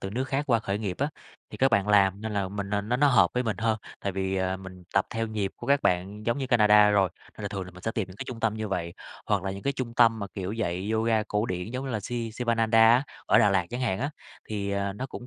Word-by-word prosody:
từ 95 - -5
nước 125 +6 -1
khác 135 +2 -1
qua 120 -5 +3
khởi 100 -1 -2
nghiệp 100 -4 -3
á, 140 - +1 0.4
thì - - -8
các 135 - +4
bạn 100 -1 +2
làm 100 -1 +4
nên 110 0 -4
là 100 -2 -1
mình 100 0 -4
n 105 0 -1
nó 120 - +2
nó 145 +3 +4
hợp 135 - +5
với 125 - +1
mình 110 -5 -2
hơn, 115 0 +1 0.2
tại 100 - -2
vì, 95 0 -1
ờ, 95 0 0
mình 95 -1 -11
tập 100 - +3
theo 115 0 -2
nhịp 105 -3 -2
của - - -9
các 140 0 +3
bạn 95 +5 -1
giống 115 +3 +1
như 135 - -2
Canada 105 -4 +6
rồi, 100 -2 +3 0.3
nên 110 - -9
là 100 - -2
thường 95 -1 -4
là 90 - -10
mình 90 0 -14
sẽ 115 - -1
tìm 110 -3 -2
những 95 - -12
cái - - -5
trung 120 -2 -6
tâm 115 -2 +1
như 110 -1 -4
vậy. 85 -3 -3 0.3
Hoặc 100 -3 +1
là 95 - -2
những 95 +1 -7
cái 140 - 0
trung 125 -3 -5
tâm 115 -2 +5
mà, 100 - -4
kiểu, 95 0 -4
dạy 100 -3 -2
yoga 110 0 +2
cổ 105 +1 -1
điển 90 +2 -4
giống 130 +2 -4
như 135 - -4
là 110 - -2
Si 115 +2 -4
Sivananda 115 -1 +1
á, 125 +3 +5 0.2
ở - - +5
Đà 105 - +5
Lạt 95 -3 +1
chẳng 120 +1 -4
hạn 115 -7 0
á, 140 +5 -2 0.4
thì, 100 -2 -3
à, 100 0 -1
nó 125 +7 -5
cũng, 125 -2 -9
105 Hz, 300 wpm, -27 LUFS, 95-115 Hz, 0.4 s, Canada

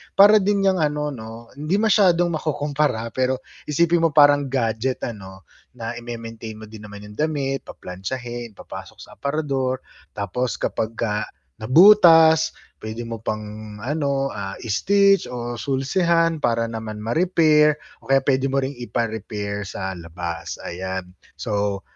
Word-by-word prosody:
para 210 +2 +8
din 200 0 +1
'yang 190 -2 +3
ano 150 -1 0
'no, 115 -2 -10
hindi 155 +5 0
masyadong 190 -5 +3
makukumpara, 145 -6 -1
pero 130 +1 -1 0.2
isipin 170 +3 +2
mo - - -3
parang 145 -1 +6
gadget 125 -1 -1
ano, 95 -4 -7 0.3
na 115 -2 -5
ime-maintain 115 -2 -7
mo 110 - -11
din 105 -1 -10
naman 105 0 -10
'yong 105 0 -12
damit, 140 -3 -1
paplantsahin, 120 +4 -6
papasok - - -10
sa - - -15
aparador 135 -3 -1 0.3
tapos 110 +5 -2
kapagka 110 -1 -2 0.3
nabutas, 165 - +7 0.3
puwede 110 +2 -6
mo 115 -1 -6
pang 105 0 -6
ano, 140 0 -1
ah, 100 -1 -5
i-stitch 195 - +3
o 120 -1 -5
sulsihan 165 +4 +1
para 115 -4 +1
naman 110 -2 -6
ma-repair 155 +2 +3 0.2
o - - -19
kaya 135 0 +3
puwede 135 -1 +1
mo 135 0 0
ring 135 0 -4
ipa-repair 105 -4 -3
sa 95 -1 -5
labas, 85 0 -6
ayan. 95 +1 -5 0.3
So, 100 -1 -2
125 Hz, 135 wpm, -22 LUFS, 110-150 Hz, 0.3 s, para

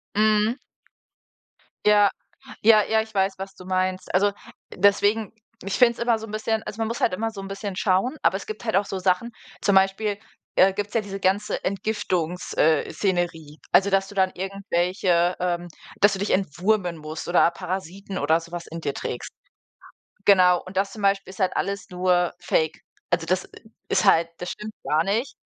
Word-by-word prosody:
Mhm. 215 +3 +3 1.3
Ja, 205 -1 +5 0.5
ja, 215 -1 +6
ja, 220 +1 +2
ich 220 0 -10
weiß, 195 -1 +1
was 195 0 -7
du 185 - -13
meinst. 185 0 -1
Also 200 +3 +3 0.4
deswegen 205 +2 +2 0.3
ich 195 +1 -4
finde 240 -1 +5
es - - -17
immer 235 -1 +2
so 220 - -7
'n - - -10
bisschen 220 +1 -1
also 215 - -8
man 225 - 0
muss 230 +2 -4
halt - - +2
immer 225 +4 -2
so 200 -3 -8
'n 195 - -7
bisschen 195 0 -5
schauen, 190 +8 +1
aber 190 - +2
es 195 - -9
gibt 215 +1 -6
halt 220 - 0
auch 200 +1 +3
so 195 - -4
Sachen 185 +6 +1 0.3
zum 200 0 +2
Beispiel, 195 +2 +2 0.4
äh, 190 +1 +5
gibt's 205 +1 -4
ja 230 - +2
diese 195 -1 -7
ganze 195 +3 0
Entgiftungs 185 -4 -2
äh, 155 -1 +3
Szenerie, 170 -6 -2
also 195 +2 +5
dass 195 0 +2
du 205 - -12
dann 190 -1 +2
irgendwelche, 180 -2 0
ähm 175 -1 -1 0.3
dass 205 0 +6
du 195 - -4
dich 200 - -2
entwurmen 185 0 0
musst 155 0 -7
oder 175 -1 +4
Parasiten 190 +2 -5
oder 160 +3 +2
so 170 0 -13
was 175 -1 -6
in 165 - -7
dir 140 -3 -2
trägst. 120 - -5 0.9
Genau, 180 -3 +6
und 185 +1 -9
das 195 +1 +1
zum 215 - -9
Beispiel 195 -1 +1
ist 190 - -14
halt 185 - +1
alles 200 -2 -3
nur 180 -1 +1
Fake. 165 -3 0 0.3
Also 175 -1 +1
das 185 +3 0
i 220 - -17 0.2
ist 190 - +2
halt 165 +1 +5
das 180 0 -5
stimmt 210 +1 -7
gar 155 +1 +2
nicht. 220 +8 -1
195 Hz, 195 wpm, -24 LUFS, 180-205 Hz, 1.3 s, ja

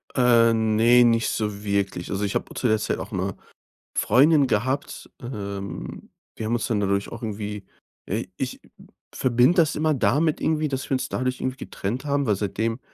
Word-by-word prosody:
Äh, 120 -2 +5
ne, 115 +2 +4
nicht 115 -1 +3
so 105 -1 -3
wirklich. 100 -3 -1
Also, 100 +1 -2
ich 100 - -2
habe - - 0
auch - - -11
zu 125 - 0
der 110 0 +3
Zeit - - -2
auch - - -7
'ne - - -2 0.6
Freundin 145 +2 +5
gehabt. 130 +5 -2
Ähm, 100 -5 -6 0.3
wir 110 - -4
haben 115 - -1
uns 120 - -1
dann 110 -3 +1
dadurch 100 0 0
auch 115 +1 -8
irgendwie 105 -1 -5 0.4
äh, - - -2
ich - - -4 0.5
verbinde 125 +7 +3
das 160 -3 +3
immer 155 0 +1
damit 145 +6 +1
irgendwie, 155 -1 +1
dass 135 -1 -4
wir - - -3
uns 130 - -1
dadurch 130 0 -2
irgendwie 130 0 -2
getrennt 125 +5 -5
haben. 140 -2 0
Weil 105 -3 +2
seitdem 110 +4 -2
115 Hz, 185 wpm, -24 LUFS, 105-130 Hz, 0.6 s, Äh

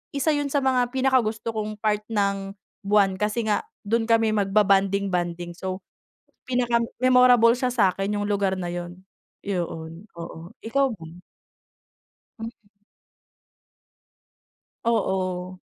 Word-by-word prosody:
isa 280 +3 +2
yun 290 -1 0
sa 280 0 0
mga 255 -2 +2
pinakagusto 245 -4 +1
kong 215 -1 -4
part 210 0 -1
ng 200 -2 -1 0.3
buwan. 200 -2 +3
Kasi 215 +1 0
nga 205 - 0 0.2
do'n 225 +2 0
kami 225 -1 +3
magba-bonding-bonding, 195 -4 +1
so 185 0 -4 0.7
pinaka-memorable 245 0 +4
siya 250 +1 0
sa'kin 200 -3 +1
yung 205 - -1
lugar 200 -2 0
na 175 -2 -4
yun. 175 +1 -7 0.4
Yoon, 170 0 -4
oo, 170 0 -8 0.2
ikaw 275 +4 +2
ba? 165 -3 -11 1.3
Mm. 225 +1 -5 2.3
Oo. 185 -5 -1
210 Hz, 105 wpm, -24 LUFS, 190-235 Hz, 2.3 s, pinaka-memorable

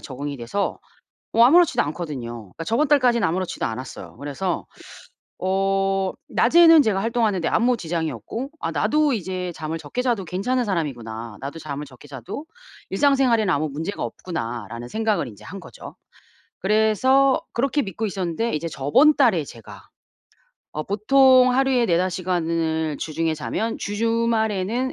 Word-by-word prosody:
적응이 140 +1 -6
돼서 125 +12 -2 0.6
뭐 230 - +6
아무렇지도 335 +5 +5
않거든요. 145 -6 -5 0.2
그러니까 - - -6
저번 275 - +1
달까지는 245 - +3
아무렇지도 180 +2 -2
않았어요. 130 +4 -7
그래서 145 +6 -3 0.7
어 195 0 +1 0.2
낮에는 330 +4 +6
제가 210 -6 0
활동하는 225 -5 +1
데 165 - 0
아무 245 +2 +2
지장이 165 -5 -2
없고 225 - -6
'아 165 - -2
나도 285 - +2
이제 185 -3 -3
잠을 160 +1 -4
적게 250 - -5
자도 235 -7 0
괜찮은 245 +9 -1
사람이구나. 120 - -4
나도 140 +4 -6
잠을 150 -1 -6
적게 130 +2 -15
자도 140 - -7 0.4
일상생활에는 255 -9 +3
아무 155 +1 0
문제가 160 +8 -4
없구나.'라는 120 - -5
생각을 220 - 0
인제 105 -4 -14
한 195 +3 -8
거죠. - - -12 0.7
그래서 220 +7 +3
그렇게 275 +4 +1
믿고 200 +3 -4
있었는데 195 +3 -2
이제 160 +2 -2
저번 210 - +4
달에 215 - +3
제가 115 -4 -13 0.8
어 155 - -3
보통 255 +4 +5
하루에 260 -2 +2
4-5 180 +1 +2
시간을 165 -4 -1
주중에 160 +1 -1
자면 220 +9 -3
주 205 0 -4
주말에는 230 +1 0
190 Hz, 350 characters per minute, -23 LUFS, 155-235 Hz, 0.8 s, 뭐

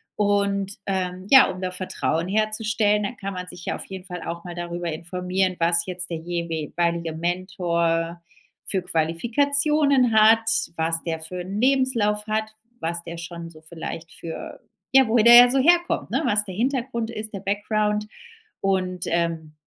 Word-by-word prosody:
Und 200 -1 0
ähm, 185 -1 -3
ja, 265 -1 +8
um 185 0 -6
da 185 0 -2
Vertrauen 180 -2 -2
herzustellen, 215 0 +1
dann 225 +5 -4
kann 195 -4 -6
man 180 0 -6
sich 175 - -10
ja - - -2
auf - - -4
jeden 190 -1 -8
Fall 180 -2 -7
auch 170 0 -6
mal 175 - -7
darüber 175 0 -4
informieren, 180 +3 -2
was 170 0 +3
jetzt 180 -1 -3
der 165 - -3
jewe 165 -2 -4
weilige 170 -1 0
Mentor 170 -1 -1 0.4
für 190 - 0
Qualifikationen 255 - +2
hat, 220 +1 +5 0.3
was 165 0 0
der 160 -1 -3
für 180 +3 -6
'n 195 +5 -4
Lebenslauf 245 -6 +2
hat, 215 0 -1 0.3
was 170 +1 -2
der 170 0 -8
schon 170 0 -7
so 155 -1 -16
vielleicht 165 0 -7
für 165 -1 -8 0.3
ja, 265 -1 +6
woher 220 0 +3
der 235 0 +9
ja 245 0 +9
so 270 - +2
herkommt, 345 +5 +2
ne? - - +1
Was 210 -4 +3
der 185 - -7
Hintergrund 235 -1 -2
ist, 215 -1 -6
der 195 - -5
Background 210 +1 -1 0.6
und, 185 -2 -1
ähm, 165 -2 -2
185 Hz, 170 wpm, -23 LUFS, 170-215 Hz, 0.6 s, der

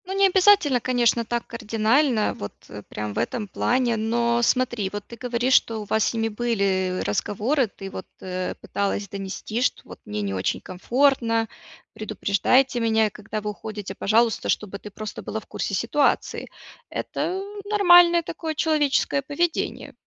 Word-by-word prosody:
Ну, 380 - -5
не 395 - +5
обязательно, 375 -8 +5
конечно, 240 -2 +2
так 235 +1 -2
кардинально, 230 +2 +1
вот, 100 - -7 0.2
э, 105 - -8
прям 105 -1 -4
в - - -2
этом 215 -4 -2
плане, 240 +3 +1
но 235 +2 +1
смотри, 240 -5 +1
вот 205 -1 -6
ты 235 - -10
говоришь, 245 +1 0
что 225 -3 +3
у - - -7
вас 220 +1 +1
с - - -1
ними 225 0 0
были 200 -5 0
разговоры, 225 - 0
ты 195 -1 -9
вот, 185 - -7
э, 185 0 -4
пыталась 200 0 -2
донести, 200 +4 -4
что: 255 - +1
"Вот - - -12
мне 105 0 -3
не 100 -1 -2
очень 95 0 -1
комфортно, 230 +3 +1 0.5
предупреждайте 240 +5 +1
меня, 220 -2 +2
когда 215 +1 -6
вы 210 0 -3
уходите, 205 -2 -7
пожалуйста", 225 +3 +1
чтобы 200 -1 -1
ты 210 - -9
просто 215 +1 -7
была 220 - -4
в - - -17
курсе 200 - -3
ситуации. 255 +8 0 0.4
Это 370 +2 -3 0.3
нормальное 350 -4 +6
такое 320 -1 -5
человеческое 295 -3 +1
поведение, 320 +5 -2
230 Hz, 160 wpm, -24 LUFS, 205-260 Hz, 0.5 s, нормальное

